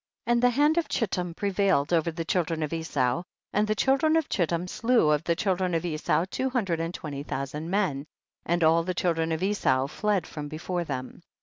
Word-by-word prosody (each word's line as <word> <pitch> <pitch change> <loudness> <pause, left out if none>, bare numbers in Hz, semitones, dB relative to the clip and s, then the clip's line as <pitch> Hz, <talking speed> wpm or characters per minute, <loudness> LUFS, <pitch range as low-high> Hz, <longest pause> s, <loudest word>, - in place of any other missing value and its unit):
4. - - 0
And 235 - +2
the 245 - +5
hand 295 +6 +3
of 330 - -2
Chittim 180 -6 -1
pre 200 +2 -1
vailed 185 -6 +2
over 165 0 +2
the 165 0 -4
children 165 -2 0
of 150 - -3
Esau, 145 -4 0 0.3
and 210 +1 +2
the 215 - +1
children 275 +7 +3
of 320 - 0
Chittim 175 -1 0
slew 230 -6 +2
of 150 +1 +1
the 170 - +2
children 185 -1 0
of 165 +1 -1
Esau 165 +1 0
two 265 - -1
and 170 -7 0
twenty 145 -5 -6
thousand 145 +3 -4
men, 170 -8 0 0.4
and 170 0 0
all 165 +1 +5
the 180 +2 -3
children 165 -2 0
of 160 +2 -1
Esau 190 -10 +2
fled 195 +4 -1
from 150 -1 -6
before 170 +4 -3
them. 130 +2 -5
170 Hz, 205 wpm, -27 LUFS, 160-200 Hz, 0.4 s, the